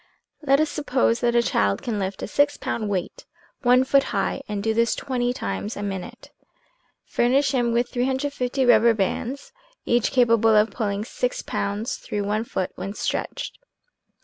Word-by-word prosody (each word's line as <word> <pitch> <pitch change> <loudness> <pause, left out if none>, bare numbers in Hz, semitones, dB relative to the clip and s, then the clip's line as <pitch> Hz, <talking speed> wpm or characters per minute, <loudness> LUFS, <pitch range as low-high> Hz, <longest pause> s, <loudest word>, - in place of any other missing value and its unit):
Let 275 -2 +3
us 310 0 +1
suppose 255 -5 +1
that 240 -1 +1
a 235 - +4
child 100 - +1
can 220 -4 -2
lift 190 0 -4
a - - -3
six 290 +5 +2
pound 215 -3 -3
weight 185 -3 -4 0.3
one 250 0 +5
foot 275 +1 +3
high - - -1
and 205 -1 -3
do 220 0 +1
this 230 +1 +2
twenty 245 -2 -1
times 225 -3 -4
a 205 - -4
minute. 195 -2 -6 0.7
Furnish 265 +4 +2
him 240 -3 +1
with 240 +1 +1
350 265 0 -1
rubber 230 -1 +5
bands, 235 +7 -3 0.3
each 240 -1 +2
capable 230 -3 +4
of 210 +1 +4
pulling 205 -2 -2
six - - -2
pounds 210 +6 -2
through 205 -1 -4
one 210 +2 -1
foot 190 -5 -3
when 195 +2 -6
stretched. - - -3
235 Hz, 165 wpm, -24 LUFS, 210-260 Hz, 0.7 s, one